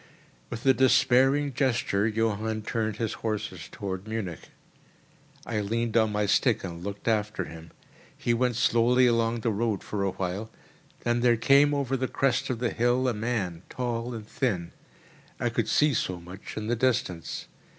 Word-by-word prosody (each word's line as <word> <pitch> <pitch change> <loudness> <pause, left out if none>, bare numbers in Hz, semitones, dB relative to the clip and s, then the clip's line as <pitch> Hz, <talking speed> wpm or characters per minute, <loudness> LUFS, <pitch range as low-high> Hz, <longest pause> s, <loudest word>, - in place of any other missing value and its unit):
With 115 - -6
a 135 - +7
despairing 135 +2 +4
gesture, 120 -6 +1
Johann 110 0 -1
turned 110 -1 -1
his 110 0 -2
horses 105 -6 -3
towards 95 0 -5
Munich. 110 -7 -5 1.0
I 110 -2 -2
leaned 115 +2 -1
on 110 -2 +4
my 105 0 0
stick 110 +3 +2
and 85 -2 -6
looked 100 +2 -6
after 105 -2 +1
him. 80 0 -10 0.5
He 120 - 0
went 125 0 +1
slowly 125 +2 +4
along 115 -1 +2
the 115 - +1
road 110 -1 -1
for 105 - -3
a 100 - +1
while: 95 +4 -4 0.5
then 120 0 +1
there 120 -1 +4
came 140 +5 +5
over 135 -2 0
the 130 0 -1
crest 135 +1 0
of 125 - -1
the 120 0 -1
hill 120 +2 +2
a 125 - +1
man 105 -6 -2
tall 120 -1 -3
and 110 -2 -8
thin. 95 -12 -1 0.7
I - - +1
could - - -1
see 150 -1 +4
so 90 -6 -1
much 90 +5 -10
in 105 - -3
the 120 +2 0
distance. 120 -8 -1
115 Hz, 170 wpm, -27 LUFS, 105-125 Hz, 1.0 s, a